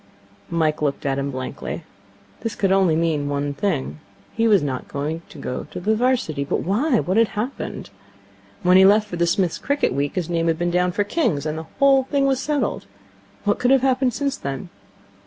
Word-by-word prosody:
Mike 160 -3 0
looked 145 -2 -1
at 135 0 0
him 140 0 -2
blankly. 130 -1 -5 0.6
This 225 -2 -4
could 195 -2 +1
only 190 -4 +4
mean 160 -3 0
one 145 0 -1
thing. 155 -3 -2 0.3
He 230 0 +2
was 205 -7 +4
not 130 -3 -4
to 150 +4 -3 0.2
go 125 -2 -4
to - - -6
the 215 +5 +1
'Varsity. 235 - 0
But 140 - -1
why? 235 - +1
What 185 +4 -1
had 230 0 +5
happened? 210 - -5 0.7
When 180 +1 +6
he - - +8
had 190 - +8
left 210 +1 +3
for 180 - -5
the 170 0 +2
Smith's 175 -1 +1
cricket 285 - 0
week, 140 +1 -1
his 180 -4 -1
name 170 -1 0
had 165 -1 +1
been 175 +1 0
down 180 +1 +2
for 205 - 0
King's, 205 - 0
and 155 0 -2
the 160 0 -6
whole 275 -1 +5
thing 275 0 +2
settled. 290 +2 -2 0.6
What 205 0 +1
could 245 - +2
have 270 -1 +5
happened 260 -2 +2
since 280 -1 -1
then? 140 +5 -5
180 Hz, 200 wpm, -22 LUFS, 150-230 Hz, 0.7 s, he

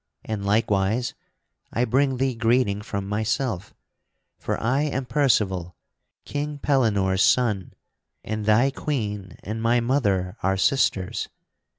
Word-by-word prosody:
And 110 -2 -3
likewise 105 +2 +1 0.6
I 120 - +1
bring 130 +2 +2
thee 130 0 +1
greeting 115 -3 +1
from 100 -1 -4
myself: 110 -1 -2 0.6
for - - -2
I 130 +5 +1
am 135 -3 -1
Percival, 105 - +1 0.5
King 145 0 -3
Pellinore's 105 -10 +2
son, 105 -7 +2 0.5
and 110 -1 -3
thy 120 +6 +4
Queen 105 -10 -4
and 110 +2 -4
my 115 +1 +3
mother 105 -8 0
are 95 +1 +1
sisters. 95 -4 +1
110 Hz, 115 wpm, -24 LUFS, 100-130 Hz, 0.6 s, thy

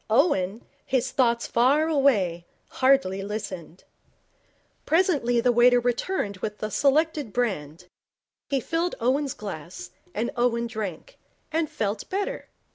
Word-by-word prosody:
Owen, 220 - +2 0.2
his 260 -1 0
thoughts 235 -3 +2
far 275 +7 +3
away, 210 - +2 0.2
hardly 260 -8 +2
listened. 195 -4 -6 1.0
Presently 295 -8 +2
the 245 +1 +3
waiter 245 +1 +5
returned 240 - -1
with 210 +2 -4
the 215 - -4
selected 295 -2 +1
brand. 180 -8 -2 0.6
He 275 - +1
filled 330 +7 -1
Owen's 265 +3 0
glass, 180 -4 -8 0.2
and 235 +2 -1
Owen 240 -1 +1
drank, 215 -8 -6 0.3
and 320 -1 0
felt 205 -1 -3
better. 395 +1 -3
240 Hz, 120 wpm, -25 LUFS, 205-275 Hz, 1.0 s, waiter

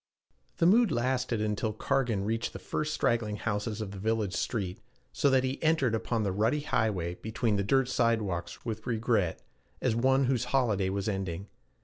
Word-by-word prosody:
The 165 - +2
mood 220 +4 +5
lasted 125 -2 0
until 105 +1 -1
Cargan 110 -3 0
reached 115 +2 -1
the - - -5
first 155 0 -3
straggling 115 -7 0
houses 105 +1 -2
of 100 -3 -4
the 100 - -8
village 110 -2 0
street, 95 0 -2 0.3
so 140 - +3
that 130 -1 +3
he 130 +1 -2
entered 155 -7 +2
upon 110 0 0
the 100 - 0
rutty 110 +10 +1
highway 110 - 0
between 110 -1 0
dirt 135 +2 +3
sidewalks 110 -9 -1
with 110 -2 -4
regret, 110 -6 0 0.4
as 110 - +1
one 130 +3 +3
whose 130 -2 +1
holiday 115 -7 +1
was 100 +1 -2
ending. 95 -2 -3
110 Hz, 165 wpm, -29 LUFS, 105-130 Hz, 0.4 s, mood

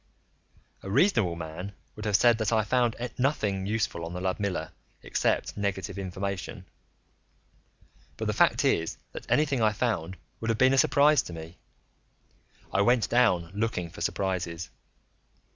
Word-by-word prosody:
A 95 - -7
reasonable 115 - +3
man 85 +4 -6 0.2
would 105 - -7
have 105 -2 +2
said 120 +3 +5
that 110 -1 0
I 110 -1 +3
found 120 +1 +1 0.2
nothing 105 -8 0
useful 105 -5 -1
on 85 +1 -5
the 90 - -4
Ludmilla, 95 +1 -2 0.3
except - - 0
negative 100 -1 -3
information. 95 -2 -4 1.5
But - - -3
the - - 0
fact - - +3
is 80 0 +1
that - - -9
anything 140 -4 +2
I 110 -1 +3
found 95 -6 -2 0.2
would 115 - -3
have 115 - +1
been 130 +2 +5
a - - +3
surprise 145 +1 +5
to 85 - -9
me; 80 +1 -9 1.1
I 100 - +3
went 120 +2 +3
down 90 -9 +3
looking 100 -5 -2
for - - -11
surprises. 90 -4 -2
100 Hz, 145 wpm, -28 LUFS, 90-115 Hz, 1.5 s, said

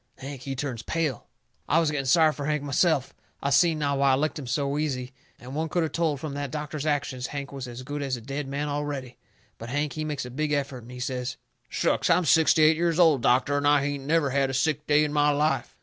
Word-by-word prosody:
Hank, 135 -1 -8
he 135 +1 -4
turns 125 -4 -4
pale. 155 -3 -2 0.4
I 160 - +4
was 160 -3 +1
getting 140 -3 -2
sorry 155 +3 +5
fur 140 +1 -5
Hank 150 -1 -1
myself. 145 -1 +1 0.3
I 140 - 0
seen 160 +3 +4
now 140 -2 0
why 135 -1 +4
I - - +5
licked 150 +3 -1
him 135 - -7
so 140 +2 -1
easy. 130 -4 -3 0.3
Any 125 - -11
one 160 +3 -2
could 175 +1 +1
of 160 - -2
told 160 -4 0
from 150 -1 -5
that 145 -1 -3
doctor's 150 +1 -4
actions 135 -4 -1
Hank 140 -1 -6
was 135 -2 -6
as 120 +1 -8
good 145 +2 -5
as 135 -2 -2
a - - -10
dead 135 +4 -5
man 140 +2 -3
already. 145 -3 -4 0.4
But 115 - -7
Hank, 145 +2 -1
he 155 - -3
makes 150 -4 -3
a 125 - -8
big 150 +3 -1
effort, 140 -3 -2
and 120 +2 -13
he 125 - -8
says: 125 0 -3 0.3
"Shucks! - - 0
I'm 180 - +4
sixty 160 0 +5
eight 155 +1 +5
years 170 -1 +1
old, 160 -7 +5
doctor, 130 +4 +3
and 145 0 +1
I 145 -1 +4
hain't 140 -1 -3
never 155 -3 +2
had 135 0 +1
a 135 - -3
sick 150 +2 0
day 150 0 +4
in 150 -1 -2
my 150 0 +3
life." 145 -3 0
145 Hz, 250 wpm, -26 LUFS, 135-150 Hz, 0.4 s, sorry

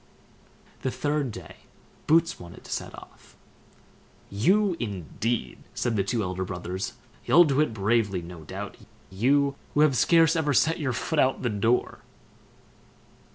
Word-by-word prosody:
The 130 - -1
third 145 +2 -1
day - - -10 0.5
Boots 165 +2 +3
wanted 85 0 -12
to - - -11
set - - -4
off. - - -16 1.0
"You, 185 - +2
indeed!" 100 - -3 0.2
said 120 - -1
the 100 - +1
two 110 +2 -1
elder 90 0 -3
brothers; 95 +1 -5 0.3
"you'll 175 - +7
do 145 -3 +2
it 155 - +1
bravely, 105 -3 0
no 85 -1 -10
doubt! - - -7 0.3
you, 140 +8 +2 0.2
who 150 - +4
have 150 -3 +4
scarce 165 +4 +4
ever 150 -4 +1
set 160 +6 +3
your 135 -5 -1
foot 155 +6 -2
out 130 -1 +3
of - - -12
the 120 - +1
door." 115 +4 0
120 Hz, 150 wpm, -26 LUFS, 100-150 Hz, 1.0 s, you'll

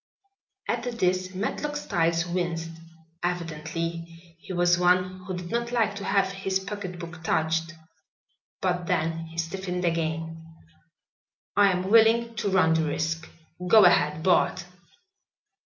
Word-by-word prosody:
At 235 - -1 0.2
this 185 -1 0
Matlock 295 +9 -3
Styles 170 - 0
winced. 170 -2 -2 0.5
Evidently 165 -1 -3 0.4
he 190 - -10
was 175 -1 +3
one 180 +1 +2
who 185 -2 -3
did 175 -1 -7
not 235 0 -1
like 225 -4 +1
to 200 - -6
have 195 -2 +1
his 195 -1 -1
pocketbook 180 -4 -7
touched. 160 +1 0 0.9
But 180 -2 -1
then 165 +1 -1
he 165 0 -13
stiffened 180 +2 -3
again. 165 -1 -2 1.1
"I 200 0 +5
am 180 0 -1
willing 230 +2 +4
to 205 - 0
run 185 -4 +4
the 160 -1 +2
risk. 160 +2 -2 0.4
Go 215 +1 +7
ahead, 150 -2 +3
Bart." 185 0 +2
180 Hz, 125 wpm, -26 LUFS, 165-195 Hz, 1.1 s, Go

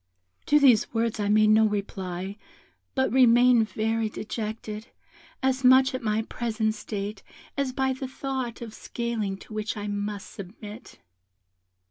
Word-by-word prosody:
"To 295 - +5
these 255 -7 +5
words 225 -1 0
I 205 -1 0
made 215 0 +5
no 220 0 +6
reply, 195 -2 -4 0.6
but 265 -1 +2
remained 245 -2 +5
very 225 0 0
dejected, 215 0 -5 0.6
as 265 0 +1
much 260 +1 +6
at 255 - -3
my 220 -1 0
present 220 -2 -1
state 205 -1 -5 0.3
as 275 -2 0
by 265 0 0
the 265 0 -5
thought 260 -3 -4
of 225 -2 -8
scaling 225 -6 -3
to 215 - -13
which 215 +1 -3
I 205 - -4
must 205 0 -4
submit. 210 +3 -10
220 Hz, 140 wpm, -26 LUFS, 210-250 Hz, 0.6 s, no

